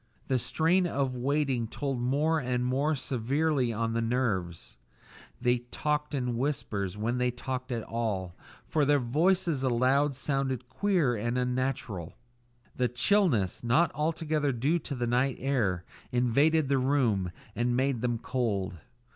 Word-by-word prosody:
The 130 -1 +2
strain 165 +8 +2
of 135 -5 -1
waiting 135 -2 0
told 135 +1 -3
more 150 +6 +2
and 125 -2 -1
more 140 +5 +1
severely 135 +1 0
on 115 +1 -1
the 115 - 0
nerves; 110 -8 -1 0.6
they 125 0 +2
talked 150 +1 -1
in 125 -3 -1
whispers 105 -8 -2
when 120 +4 -1
they 125 0 +2
talked 130 +1 -5
at 115 -2 -2
all, 100 -6 -3 0.3
for 155 - +1
their 145 +1 +4
voices 160 +4 +1
aloud 130 +3 +2
sounded 135 -2 -2
queer 170 -4 +1
and 120 +3 -1
unnatural. 125 -8 -2 0.6
A 125 - +3
chilliness, 125 - +2
not 130 +9 +3
altogether 155 -1 0
due 140 +8 +1
to 140 - -5
the 120 -1 -1
night 125 +2 +1
air, 110 -10 0 0.3
invaded 140 +5 +3
the 135 0 +2
room, 125 -9 +1 0.3
and 120 +2 +1
made 130 -3 +1
them 120 -1 0
cold. 105 -7 -2
125 Hz, 140 wpm, -29 LUFS, 120-145 Hz, 0.6 s, their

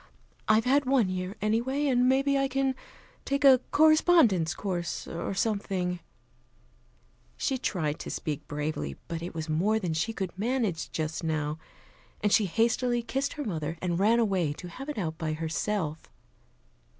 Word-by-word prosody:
I've 220 +2 +4
had 280 +2 +3
one 255 -7 +3
year, 185 +2 -3
anyway. 240 +7 +1
And 250 -2 +3
maybe 275 +1 +3
I 275 0 +2
can 270 0 0 0.5
take 280 +1 0
a 265 -2 +8
correspondence 310 - +4
course, 175 -4 -3
or 170 +3 -4
something 190 -4 -1 0.7
" - - -36
She 265 -2 -1
tried 155 - -1
to - - -6
speak 150 -3 -4
bravely, 145 - -3
but 165 -1 -4
it 170 0 -6
was 160 0 -4
more 180 +8 +2
than 180 -7 -2
she 165 +8 -1
could 190 -5 -4
manage 215 -5 -1
just 155 +1 -3
now, 155 -1 -1 0.6
and 210 -1 +1
she 215 - +5
hastily 235 +4 +1
kissed 270 +3 -2
her 295 - -4
mother, 165 -5 -3
and 175 -1 -1
ran 220 +4 +4
away 190 -9 +1
to 175 +4 -9
have 270 - -8
it 295 - -4
out 160 -5 -3
by 155 -2 -1
herself. 160 +1 -2
200 Hz, 160 wpm, -28 LUFS, 165-255 Hz, 0.7 s, a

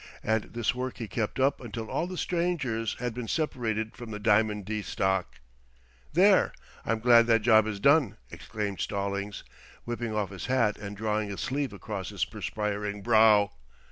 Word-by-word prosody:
And 110 0 +1
this 120 0 -1
work 125 0 -4
he 115 - -5
kept 110 +5 -3
up 135 +1 +2
until 115 -2 -6
all 170 - -1
the 185 0 -6
strangers 155 - -1
had 125 -1 -3
been 120 0 -5
separated 110 -8 -2
from 120 -2 -9
the 105 - -5
Diamond 105 -1 +2
D 110 +1 -2
stock. 95 -2 -1 0.8
"There, - - +4 0.3
I'm 115 0 0
glad 115 -1 +6
that 115 -2 +3
job 110 -2 +5
is 105 -2 -4
done," 140 -3 +4
exclaimed 105 -3 -5
Stallings, 100 0 -3 0.4
whipping 120 -2 -4
off 100 -3 -1
his 95 - -6
hat 120 -5 +2
and 100 0 -7
drawing 105 -1 -1
a 100 - -5
sleeve 135 +3 -2
across 100 -1 -6
his - - -1
perspiring 105 -1 -4
brow. 110 -2 +5
110 Hz, 170 wpm, -28 LUFS, 105-120 Hz, 0.8 s, glad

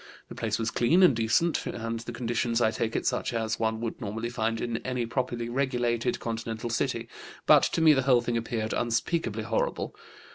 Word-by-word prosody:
The - - -7
place 110 -1 -2
was 115 0 -1
clean 165 +11 +4
and 170 -9 +6
decent, 115 +9 +2
and 115 0 -3
the 115 +1 -7
conditions, 120 -1 -1
I 110 -2 +3
take 110 0 -2
it, - - -1
such - - -1
as 110 -1 -1
one 110 0 0
would 115 +2 -4
normally 115 +2 -3
find 115 -1 -1
in 120 -1 -2
any 125 -1 -2
properly 120 0 -2
regulated 120 -2 0
continental 115 0 -4
city; 115 - -1 0.4
but - - +7
to - - +1
me 160 -1 +7
the 135 - +2
whole 125 -2 +4
thing 120 0 -2
appeared 115 -1 -2
unspeakably 120 -1 -1
horrible. 115 0 -2
115 Hz, 190 wpm, -28 LUFS, 115-120 Hz, 0.4 s, but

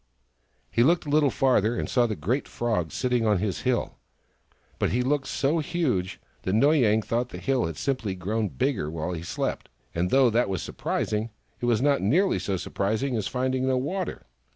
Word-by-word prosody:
He - - +2
looked 165 +8 +3
a - - -5
little 145 -1 +4
farther 120 -4 +2
and - - -2
saw 120 -2 +2
the 110 - -2
great 125 +8 -1
Frog 110 -9 -1
sitting 125 -2 0
on 105 -2 +3
his 95 0 -2
hill. 125 -2 -1 0.8
But - - +2
he 125 +1 +1
looked 135 +1 0
so 150 +5 +1
huge 145 - -1 0.2
that 95 - -2
Noy 145 +8 +4
Yang 110 -3 +3
thought 120 +3 -1
the - - -8
hill 135 -3 0
had 80 - -6
simply 120 -8 -2
grown 105 +4 -1
bigger 125 - -1
while 80 +2 -3
he 85 -2 -4
slept; 85 - -3 0.2
and 90 +2 0
though 130 0 +5
that 120 0 +2
was 95 -3 -2
surprising, 110 +1 -2 0.3
it 120 - -2
was 120 0 +2
not 140 -1 +3
nearly 165 - +2
so 95 -2 -2
surprising 110 +9 -1
as 110 - -1
finding 130 0 -1
no 130 -1 +2
water. 180 +8 -3
120 Hz, 195 wpm, -26 LUFS, 105-135 Hz, 0.8 s, though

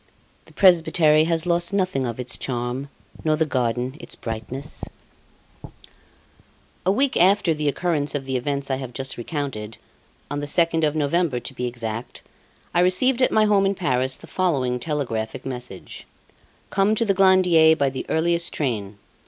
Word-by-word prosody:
"The - - -19
Presbytery 165 -4 +4
Has 165 0 0
Lost 170 0 +1
Nothing 185 -10 0
of 115 +1 -5
Its 125 0 -2
Charm, 125 +2 -3 0.3
Nor 155 -1 +2
the 160 +1 +1
Garden 125 -1 -1
Its 170 - -4
Brightness" 120 +5 -6 2.0
A - - +5
week 270 +6 +1
after 190 -1 +4
the 150 -1 -2
occurrence 150 -2 -1
of 135 -2 -3
the 130 0 -3
events 140 +2 -2
I 130 - 0
have 130 -2 -7
just 135 +1 -4
recounted 120 -5 -5 0.5
on 145 - -2
the 145 - -4
2nd 165 +1 +2
of 150 - -3
November, 150 -2 +1
to 135 - -8
be 125 -1 -3
exact 115 -1 -6 0.5
I 175 - +3
received 235 +9 +3
at 255 - +3
my 215 -1 +4
home 200 -2 +3
in 195 - 0
Paris 130 -6 0
the - - -13
following 135 -9 0
telegraphic 125 -4 -3
message: 125 -7 -7 0.6
"Come 200 +2 +2
to 230 - 0
the 200 - +2
Glandier 180 -4 +5
by 140 -3 0
the 130 - -6
earliest 170 +1 +1
train. 105 -8 -3
145 Hz, 160 wpm, -23 LUFS, 125-175 Hz, 2.0 s, A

